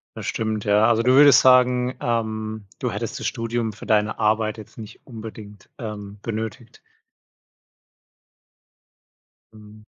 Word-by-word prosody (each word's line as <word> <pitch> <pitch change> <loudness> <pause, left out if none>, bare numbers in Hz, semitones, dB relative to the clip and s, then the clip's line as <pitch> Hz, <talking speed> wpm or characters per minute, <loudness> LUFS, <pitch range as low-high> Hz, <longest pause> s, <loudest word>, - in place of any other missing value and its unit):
Das - - -7
stimmt, 110 -2 -2
ja. 105 +1 +4
Also, 115 0 +2
du 125 +2 +4
würdest 145 +1 +7
sagen, 125 0 +4
ähm, 110 -2 -3
du - - -2
hättest - - -5
das - - -2
Studium 115 -1 -2
für 110 - -12
deine 105 0 +1
Arbeit 110 0 +1
jetzt 110 - -13
nicht 110 -2 -11
unbedingt, 110 -4 -11
ähm, 105 -3 -7
benötigt. 110 +1 -6 2.7
Mhm. 105 0 -16
110 Hz, 125 wpm, -22 LUFS, 105-115 Hz, 2.7 s, würdest